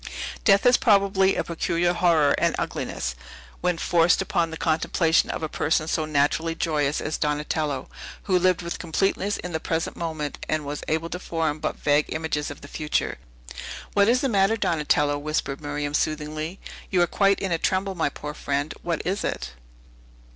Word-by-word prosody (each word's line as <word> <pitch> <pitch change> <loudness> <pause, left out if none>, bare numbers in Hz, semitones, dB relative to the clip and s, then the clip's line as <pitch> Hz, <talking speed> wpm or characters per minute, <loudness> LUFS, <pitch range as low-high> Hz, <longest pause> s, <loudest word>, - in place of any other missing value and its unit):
Death 200 -1 +5
has 245 0 +6
probably 195 -4 +3
a - - 0
peculiar 170 +1 0
horror 165 -5 +4
and - - +2
ugliness, 70 - -3 0.5
when 180 -1 0
forced 170 0 +3
upon 170 -1 0
the 160 - -6
contemplation 160 +1 +2
of - - -3
a - - 0
person 155 +1 0
so 160 -1 0
naturally 155 +2 +1
joyous 150 -3 0
as 155 - -3
Donatello, 150 -2 -1 0.4
who 185 -3 +2
lived 185 -1 +2
with 170 - -4
completeness 195 +4 0
in 180 - -6
the 160 - -1
present 160 0 -2
moment, 160 -3 -4
and 155 -1 0
was 145 +1 -4
able 160 +2 -1
to 180 - -3
form 160 -4 -2
but 155 - -2
vague 145 +1 +2
images 160 -2 -2
of 145 - -9
the 145 - -10
future. 105 - -2 0.7
"What 200 +1 +4
is 250 +1 +3
the 275 - +1
matter, 205 -1 +3
Donatello?" 150 -5 +1
whispered 150 -2 -2
Miriam 145 0 -3
soothingly. 155 +3 -2 0.3
"You 185 - +2
are - - +4
quite 195 +3 +2
in 195 - -2
a 165 - +1
tremble, 190 +2 0
my 165 -5 0
poor 150 +1 -7
friend! 145 +1 -2
What 170 -2 -2
is 195 +3 -1
it?" - - -3
160 Hz, 175 wpm, -25 LUFS, 150-180 Hz, 0.7 s, has